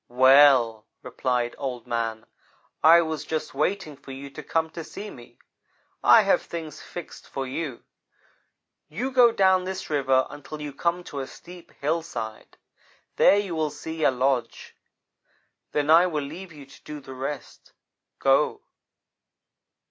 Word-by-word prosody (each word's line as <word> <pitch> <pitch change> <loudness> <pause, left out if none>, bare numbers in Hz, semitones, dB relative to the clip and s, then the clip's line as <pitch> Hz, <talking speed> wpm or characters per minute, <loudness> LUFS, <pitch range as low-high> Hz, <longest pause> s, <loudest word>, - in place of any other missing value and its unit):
"'Well,' 130 -3 +5 0.2
replied 125 -1 -1
Old 125 -4 -4
man, 115 -2 -3 0.6
'I 170 +2 +8
was 160 -2 -4
just 155 0 -4
waiting 155 +2 -1
for 140 0 -13
you 135 +1 -8
to - - -8
come 160 -1 -1
to 165 - -7
see 205 +6 -8
me. 120 -1 -14 0.7
I - - +7
have - - +3
things 160 -2 -7
fixed 175 - -10
for 135 - -4
you. 135 -1 -5 1.1
You 245 - -3
go 250 -2 +6
down 190 -3 +3
this 190 -2 -5
river 135 -3 +2
until 150 +1 -9
you 150 -1 -6
come 170 +5 -1
to 145 - -7
a 135 - -4
steep 175 0 -13
hillside. 140 -8 -4 0.6
There 200 - +6
you 200 -4 -2
will 155 -2 0
see 160 +2 -6
a - - +6
lodge. 130 0 -1 1.0
Then 150 +1 +1
I 170 +3 +7
will 155 -4 -2
leave 170 +6 -8
you 145 -3 -12
to 135 0 -18
do 150 0 -7
the 135 -1 -11
rest. 135 +2 -7 0.5
Go!' - - +2
150 Hz, 150 wpm, -25 LUFS, 130-165 Hz, 1.1 s, I